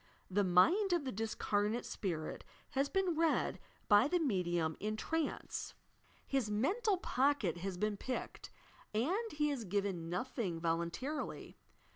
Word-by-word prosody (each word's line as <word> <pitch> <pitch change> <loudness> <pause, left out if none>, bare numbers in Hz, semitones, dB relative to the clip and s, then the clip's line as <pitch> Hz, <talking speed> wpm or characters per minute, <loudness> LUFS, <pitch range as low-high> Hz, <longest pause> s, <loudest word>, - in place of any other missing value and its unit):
The 205 +2 +3
mind 335 - +5
of 340 -5 +1
the 260 - -2
disearnate 215 +1 0
spirit 165 -7 -3 0.3
has 275 +1 +1
been 380 -3 +1
read 325 0 +2 0.3
by 205 +3 +6
the 355 - +2
medium 175 - +1
in 215 +1 -1
trance. 320 +5 -2 0.5
His 265 -6 0
"mental 375 - +2
pocket 270 - +1
has 185 +1 -4
been 210 +1 0
picked," 255 +5 -4 0.5
and 380 - 0
he 300 0 +1
has 275 -5 -2
given 195 -4 -1
nothing 200 -3 -2
volun 165 0 0
tarily. 275 - -4
220 Hz, 135 wpm, -35 LUFS, 185-300 Hz, 0.5 s, by